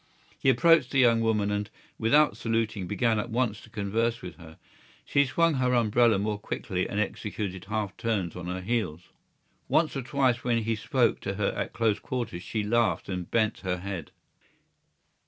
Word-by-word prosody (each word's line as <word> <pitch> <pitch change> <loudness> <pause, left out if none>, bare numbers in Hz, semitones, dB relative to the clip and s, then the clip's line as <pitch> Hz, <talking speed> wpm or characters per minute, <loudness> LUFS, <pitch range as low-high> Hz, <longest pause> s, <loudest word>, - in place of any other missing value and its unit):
He - - +3
approached 145 +1 +5
the 140 - -1
young 120 -3 +5
woman 105 -2 +1
and, 105 0 -2 0.3
without 145 +7 +4
saluting, 115 -4 -1
began 110 +3 +1
at 120 - -3
once 115 -2 -1
to - - -15
converse 115 +2 -1
with 90 -2 -8
her. 80 -2 -13 0.5
She 140 -1 +2
swung 165 +5 +2
her 125 -2 +1
umbrella 115 -1 +4
more 105 +1 -2
quickly 95 -3 -3
and 100 - -2
executed 100 -3 -3
half 105 -1 -3
turns 100 -7 -1
on 90 -1 -6
her 90 +1 -3
heels. 90 -6 -2 0.6
Once 160 -2 +2
or 135 - -1
twice 125 -1 +1
when 115 -2 +1
he 115 +1 0
spoke 110 - +1
to - - -4
her - - 0
at - - -3
close 110 -3 +1
quarters 115 -7 -4
she 110 +3 -3
laughed 115 +1 +1
and 90 -2 -4
bent 110 -1 +1
her 90 -2 -2
head. 90 -3 -6
110 Hz, 175 wpm, -27 LUFS, 100-120 Hz, 0.6 s, approached